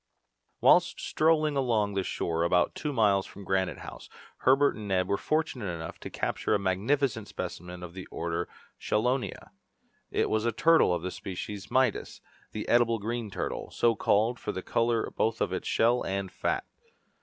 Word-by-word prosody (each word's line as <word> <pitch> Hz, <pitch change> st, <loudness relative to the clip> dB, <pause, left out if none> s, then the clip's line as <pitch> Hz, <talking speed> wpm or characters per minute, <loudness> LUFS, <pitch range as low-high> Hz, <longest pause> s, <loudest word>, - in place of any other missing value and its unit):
Whilst -, -, +5 dB
strolling 155 Hz, -2 st, +2 dB
along 115 Hz, -7 st, +1 dB
the 100 Hz, -, 0 dB
shore 85 Hz, -2 st, -2 dB
about 90 Hz, +1 st, +2 dB
two 150 Hz, -, -3 dB
miles 105 Hz, -6 st, +2 dB
from 100 Hz, -, -11 dB
Granite 95 Hz, 0 st, 0 dB
House, -, -, -10 dB, 0.3 s
Herbert 135 Hz, +2 st, +4 dB
and 105 Hz, -2 st, -7 dB
Neb 90 Hz, -2 st, +1 dB
were 100 Hz, -, +1 dB
fortunate 155 Hz, -3 st, -1 dB
enough 80 Hz, -1 st, -7 dB
to -, -, -7 dB
capture -, -, -1 dB
a -, -, +1 dB
magnificent 110 Hz, +4 st, 0 dB
specimen 90 Hz, +1 st, -6 dB
of 85 Hz, -1 st, -8 dB
the 95 Hz, 0 st, -8 dB
order 85 Hz, 0 st, -3 dB
of -, -, -5 dB, 0.3 s
chelonia. 125 Hz, +4 st, -1 dB, 0.6 s
It -, -, +1 dB
was 110 Hz, 0 st, 0 dB
a 115 Hz, -, +1 dB
turtle 165 Hz, -, +4 dB
of 85 Hz, -1 st, -1 dB
the 95 Hz, -, -3 dB
species 95 Hz, +1 st, -6 dB
Midas, 130 Hz, -4 st, +1 dB, 0.3 s
the 105 Hz, -, -5 dB
edible 120 Hz, -1 st, +4 dB
green 115 Hz, +1 st, -3 dB
turtle, -, -, -4 dB
so 115 Hz, -1 st, +2 dB
called 110 Hz, +4 st, +2 dB
from -, -, -4 dB
the 95 Hz, -, -4 dB
colour 115 Hz, -1 st, +1 dB
both 110 Hz, 0 st, 0 dB
of -, -, 0 dB
its -, -, -3 dB
shell 120 Hz, +2 st, +3 dB
and 95 Hz, -1 st, -3 dB
fat. -, -, -1 dB
105 Hz, 175 wpm, -29 LUFS, 95-120 Hz, 0.6 s, Whilst